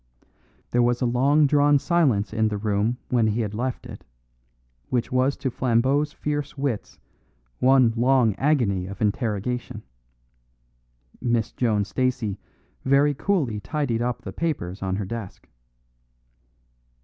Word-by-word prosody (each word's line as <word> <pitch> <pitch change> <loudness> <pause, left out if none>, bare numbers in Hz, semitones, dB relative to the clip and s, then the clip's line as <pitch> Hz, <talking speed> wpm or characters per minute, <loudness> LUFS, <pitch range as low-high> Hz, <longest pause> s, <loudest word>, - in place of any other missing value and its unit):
There 120 - +3
was 120 0 +2
a 125 - 0
long 135 +5 +3
drawn 145 0 +4
silence 135 - +1
in 110 0 +2
the 105 -1 -2
room 105 +3 0
when 120 -3 +2
he 110 +2 0
had 105 -2 -3
left 125 +3 -3
it, - - -10 0.9
which 125 -2 -1
was 130 +2 +1
to 130 - -2
Flambeau's 130 +5 +1
fierce 145 0 -4
wits 135 -6 -3 0.6
one 130 -3 +4
long 120 -2 +3
agony 110 -10 +1
of 100 0 -8
interrogation. 110 +2 -2 1.4
Miss 120 -3 0
Joan 110 -5 0
Stacey 115 -4 -1 0.4
very 140 +2 +3
coolly 140 - -1
tidied 130 -2 -2
up 120 -1 -2
the 95 - -7
papers 100 - -3
on 95 -1 -1
her 100 0 -3
desk. 110 -1 -7
120 Hz, 130 wpm, -24 LUFS, 110-135 Hz, 1.4 s, drawn